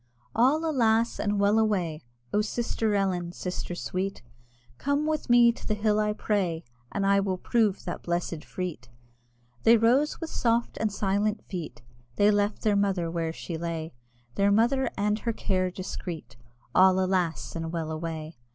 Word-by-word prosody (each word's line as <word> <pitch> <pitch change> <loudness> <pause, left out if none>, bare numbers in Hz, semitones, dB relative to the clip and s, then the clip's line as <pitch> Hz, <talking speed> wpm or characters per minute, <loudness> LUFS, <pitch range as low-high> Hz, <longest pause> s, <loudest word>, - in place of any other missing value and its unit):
All, 280 +8 +3
alas! 230 -5 +2
and 205 -1 0
well 205 +2 +4
away! 180 -8 0 0.3
"Oh, 210 - +3
sister 220 -1 -1
Ellen, 180 -3 0
sister 180 0 -4
sweet, 185 0 -3 0.6
Come 285 +2 0
with 310 -3 -2
me 240 -1 +7
to - - -10
the 215 - +1
hill 210 0 +1
I 210 0 +1
pray, 185 -6 -1 0.3
And 200 - -1
I 200 0 +4
will 190 -2 -1
prove 215 0 +1
that 175 - -4
blessed 170 -2 -2
freet!" 170 -10 -6 0.7
They 230 - +6
rose 250 +7 +3
with 330 - -5
soft 235 0 +1
and 220 -1 0
silent 205 +2 0
feet, 170 -9 -7 0.3
They 205 +6 +5
left 205 0 0
their 210 -2 +3
mother 195 -4 +1
where 165 -1 -1
she 165 0 -6
lay, 165 -2 -4 0.4
Their 200 +6 +2
mother 240 +6 +3
and 210 +2 +1
her 230 0 -2
care 185 -3 0
discreet, 175 - -6 0.4
(All, 185 0 +6
alas! 185 -4 0
and 165 -1 -3
well 165 -2 -3
away!) 160 -2 -5
200 Hz, 160 wpm, -27 LUFS, 175-220 Hz, 0.7 s, me